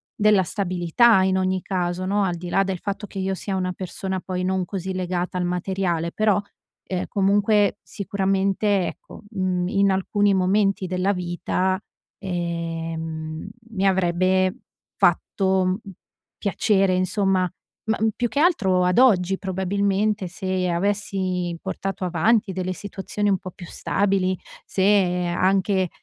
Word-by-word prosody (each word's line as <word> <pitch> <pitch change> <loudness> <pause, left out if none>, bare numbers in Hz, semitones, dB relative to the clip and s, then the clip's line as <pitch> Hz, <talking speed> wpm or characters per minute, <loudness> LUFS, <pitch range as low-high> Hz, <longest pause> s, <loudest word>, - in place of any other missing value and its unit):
della 210 -2 +4
stabilità, 190 +3 +3
in 190 0 +2
ogni 185 0 0
caso 180 -1 -2
no, 200 +2 +1
al 180 -3 0
di 175 +1 -7
là 195 - +3
del 190 -2 -3
fatto 200 +2 -4
che 195 - -7
io 190 0 -1
sia 195 +1 -4
una 185 -1 -1
persona 190 +1 -4
poi 185 0 -4
non 185 0 0
così 190 0 -4
legata 180 0 -2
al 180 - 0
materiale, 180 -2 -1
però, 210 0 +2 0.4
ehm, 185 -1 -3
comunque, 205 +1 +2
sicuramente 195 0 0
ecco, - - -10
mhmm, 185 -4 -1
in 200 -1 +3
alcuni 200 +2 +2
momenti 195 +1 +2
della 185 +2 +1
vita, 180 +1 -1 0.4
ehm, 165 -2 -4 0.2
mi 195 -3 0
avrebbe 185 0 +2 0.4
fatto, 190 -1 +2
mhmm, 185 0 +1 0.6
piacere, 195 -2 +2
insomma. 185 0 +1 0.4
Ma 220 - +2 0.2
più 245 - 0
che 235 +5 -2
altro 200 - +3
ad 180 +4 +3
oggi 195 -7 +4
probabilmente 195 +2 0
se 185 0 -2
avessi 185 -1 -1
portato 195 +1 -4
avanti 195 +5 +2
delle 185 0 -2
situazioni 205 +2 -3
un 195 -2 +2
po' 185 - -7
più 180 - -11
stabili, 190 0 0 0.3
se 190 -2 +2
anche, 190 +1 +1
190 Hz, 135 wpm, -23 LUFS, 180-200 Hz, 0.6 s, della